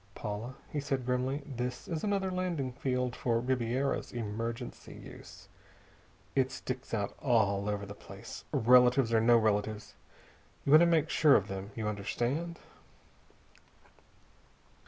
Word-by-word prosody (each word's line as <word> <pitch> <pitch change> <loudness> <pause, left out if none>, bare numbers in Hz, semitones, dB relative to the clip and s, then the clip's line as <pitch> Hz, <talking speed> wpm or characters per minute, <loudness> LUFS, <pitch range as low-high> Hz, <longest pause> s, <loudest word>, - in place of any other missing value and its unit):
"Paula," 110 +5 -5 0.2
he 150 - -2
said 135 -3 -2
grimly, 130 +3 -1
"this 125 -2 -4
is 160 -2 -3
another 200 -2 0
landing 175 -8 -2
field 125 -1 -1
for 115 -2 0
Ribiera's 130 +2 -1
emergency 115 0 -5
use. - - -12 0.9
It 130 -1 +3
sticks 130 0 -6
out 100 -3 -1
all 105 -5 +2
over 100 -1 -2
the 100 - -8
place. - - -10
Relatives 125 +1 +5
or 110 - +4
no 120 +1 +6
relatives, 105 -1 0 0.7
you 140 - +1
want 155 - +10
to 170 - +5
make 160 -2 +2
sure 150 -3 +6
of 100 - +2
them. 95 +1 -5
You 110 -2 -3
understand?" 120 - -2
125 Hz, 135 wpm, -31 LUFS, 110-140 Hz, 0.9 s, want